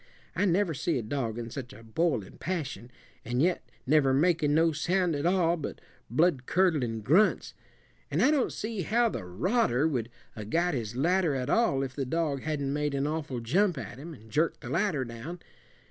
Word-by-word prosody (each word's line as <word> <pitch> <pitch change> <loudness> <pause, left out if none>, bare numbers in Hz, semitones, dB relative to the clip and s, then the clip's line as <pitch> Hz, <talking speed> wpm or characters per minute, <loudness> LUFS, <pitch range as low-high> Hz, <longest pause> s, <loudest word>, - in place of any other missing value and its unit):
I - - +2
never 180 -1 +2
see 155 +3 -1
a 120 - -2
dog 115 -1 -3
in 115 -1 -5
such 130 -1 -7
a 115 - -13
boiling 115 - -1
passion, 145 -9 -4 0.3
and 120 +2 -2
yet 175 +5 +1 0.2
never 135 -1 +4
making 155 -1 +3
no 165 +1 +4
sound 175 +2 +1
at 145 +3 0
all 175 -2 +2
but 155 - -6 0.3
bloodcurdlin' 140 - +2
grunts. 180 - +3 0.6
An' - - -1
I - - +5
don't 290 -4 +1
see 220 -2 -4
how 230 +6 +2
the 115 - -5
rodder 130 - +1
would 120 -7 -2 0.3
'a' 110 -2 -6
got 170 +10 +1
his 115 -3 -3
ladder 170 +2 +2
at 130 +1 -2
all 140 -13 +2
if 130 -1 -5
the 140 - -2
dog 150 -2 -1
hadn't 145 -3 -2
made 150 -1 -1
an 140 0 0
awful 150 -5 -3
jump 175 - +2
at 130 -1 -7
him, 160 +3 -8
and 110 -3 -17
jerked 160 +6 +1
the 125 -3 -7
ladder 165 -5 +1
down. 120 +9 -7
150 Hz, 190 wpm, -29 LUFS, 125-175 Hz, 0.6 s, I